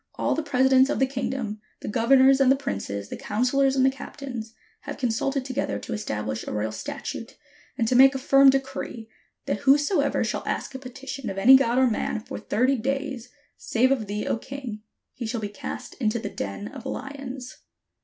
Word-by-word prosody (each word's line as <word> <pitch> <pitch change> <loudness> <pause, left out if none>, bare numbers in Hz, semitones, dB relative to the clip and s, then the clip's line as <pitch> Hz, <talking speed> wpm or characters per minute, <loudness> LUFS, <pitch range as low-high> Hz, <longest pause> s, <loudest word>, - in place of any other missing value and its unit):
All - - 0
the 320 - -1
presi 265 -3 +2
dents 265 +1 +6
of - - 0
the 265 - +3
kingdom, 255 -5 -3 0.2
the - - -6
governors, 265 +5 +5
and 265 -1 +6
the - - +5
princes, 100 - -4
the - - -5
counsellors, 265 +5 +1
and 260 -1 +4
the 265 - +4
captains, 260 -4 -8 0.2
have - - -7
consulted 260 +2 -1
to 260 - -5
gether 275 - -1
to 235 - -6
establish 110 - -3
a - - -3
royal 105 +1 -2
statute, 110 - -6 0.4
and 225 - +1
to 250 - +2
make 270 +2 +7
a - - +1
firm 275 +1 +6
decree, 270 -4 -2 0.4
that - - -1
whosoever 285 +2 +3
shall - - -2
ask - - -2
a 265 - -6
petition 265 -1 -7
of 195 - -5
any 250 +7 +8
God 250 -2 +3
or 260 - +5
man 220 -2 -1
for 215 - -7
thirty 255 +5 +1
days, 265 0 -3 0.3
save 255 +3 +1
of 235 -6 0
thee, 210 +1 -3
O - - 0
king, 250 -5 -7 0.3
he 235 - -5
shall 230 +1 -2
be 205 - -3
cast 205 - -7
into 215 0 +1
the 215 -3 -4
den 105 - -5
of 270 -3 -9
lions. 265 -2 -6
255 Hz, 200 wpm, -25 LUFS, 220-270 Hz, 0.4 s, any